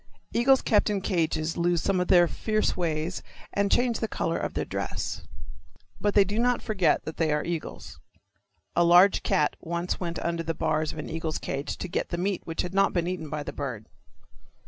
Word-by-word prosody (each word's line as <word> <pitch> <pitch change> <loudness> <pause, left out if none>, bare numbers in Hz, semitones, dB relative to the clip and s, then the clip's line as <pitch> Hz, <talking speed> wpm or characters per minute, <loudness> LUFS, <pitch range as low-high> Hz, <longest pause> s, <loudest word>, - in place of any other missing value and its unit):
Eagles 265 +3 +4
kept 210 -1 +3
in 205 -1 0
cages 165 -4 -1
lose 175 0 +2
some 190 +2 +1
of 180 - 0
their 175 -1 +6
fierce 215 +4 0
ways 165 0 -2 0.3
and 200 0 +1
change 240 -2 +2
the 225 - -1
colors - - -2
of - - -3
their - - -1
dress. - - -4 0.7
But 205 -1 0
they 205 - +7
do 205 +3 -2
not 245 0 +2
forget 190 -8 +1
that 155 - -6
they 160 -1 +1
are 150 0 +1
eagles. 170 -2 -5 0.8
A 175 - +4
large 175 +3 +6
cat 150 - +1
once 170 +1 -3
went 170 -2 -3
under 170 0 -2
the 165 -1 -3
bars 155 0 0
of - - -10
an 155 - -5
eagle's 160 -1 -3
cage 140 +1 -4
to - - -4
get 175 - -2
the 170 - -2
meat 190 +2 -1
which 165 - -2
had 180 - -5
not 195 0 +3
been 175 -2 +1
eaten 175 -4 -4
by 150 0 -3
the - - -6
bird. 125 -7 -5
175 Hz, 205 wpm, -27 LUFS, 160-195 Hz, 0.8 s, they